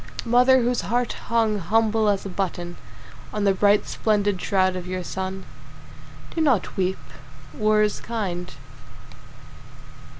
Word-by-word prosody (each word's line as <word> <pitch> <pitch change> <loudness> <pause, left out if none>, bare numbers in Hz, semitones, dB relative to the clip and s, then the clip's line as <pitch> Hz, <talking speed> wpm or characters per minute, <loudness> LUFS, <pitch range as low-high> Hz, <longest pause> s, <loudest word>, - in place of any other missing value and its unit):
Mother 250 +2 +5
whose 245 +1 +1
heart 245 0 -1
hung 225 -3 +1
humble 220 +3 +2
as 200 -1 0
a - - -4
button 175 -2 -3 0.6
On 210 - -2
the 200 -1 +4
bright 205 +2 +3
splendid 205 -3 0
shroud 185 -1 +1
of 180 -1 -5
your 185 0 -3
son, 190 +1 -5 0.9
Do 330 - -1
not 260 - +1
weep. 190 0 0 0.6
War 215 +5 +2
is 210 - -1
kind. 180 -6 -4
205 Hz, 130 wpm, -23 LUFS, 185-225 Hz, 0.9 s, Mother